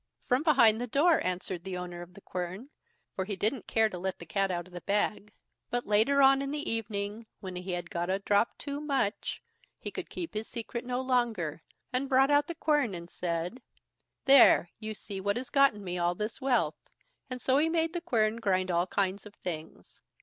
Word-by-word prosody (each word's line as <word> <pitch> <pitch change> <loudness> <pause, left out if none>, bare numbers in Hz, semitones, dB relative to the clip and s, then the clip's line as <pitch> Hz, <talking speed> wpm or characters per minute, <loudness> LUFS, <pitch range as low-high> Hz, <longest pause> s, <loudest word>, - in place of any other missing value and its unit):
"From 250 +2 +2
behind 240 -8 +5
the 245 - -2
door", 310 +7 +3
answered 180 -1 -3
the 190 -1 -4
owner 175 -1 -6
of 175 +1 -12
the 200 - -13
quern, 185 +10 -5 0.4
for 190 - -1
he 200 0 -3
didn't 220 +4 -1
care 225 -1 +3
to 185 -4 -7
let 190 +1 -3
the 170 - -10
cat 195 +3 0
out 175 -2 -2
of 185 - -18
the 175 - -7
bag. 210 +1 0 0.4
But 245 0 -2
later 225 +7 +4
on 270 0 +7
the 290 +2 -3
evening, 215 0 -3
when 185 -2 -7
he 180 +1 -4
had 175 0 -4
got 175 +1 -2
a 190 - +2
drop 200 +3 +1
too 285 0 -5
much, 270 -8 -1 0.3
he - - -6
could - - -6
keep 340 -2 -6
his 215 +1 -3
secret 235 +1 -5
no 250 +1 -1
longer, 235 - 0 0.3
and 265 +2 0
brought 270 +1 +4
out 290 0 +4
the 340 - -5
quern 295 - +1
and 170 0 -9
said: 175 +7 -3 0.6
"There, 265 -10 +7
you 215 -1 -5
see 200 -1 -7
what 200 +2 0
has 255 +1 -6
gotten 275 -7 +4
me 180 -1 -3
all 175 0 +1
this 210 +4 -4
wealth"; 225 - 0 0.4
and 255 -1 -5
so 260 +2 +2
he 320 +2 +2
made 325 0 +1
the 345 - -2
quern 225 -9 +1
grind 185 -4 +1
all 175 +1 +1
kind 195 0 -1
of 210 - -13
things. 160 -3 -7
215 Hz, 210 wpm, -30 LUFS, 185-260 Hz, 0.6 s, on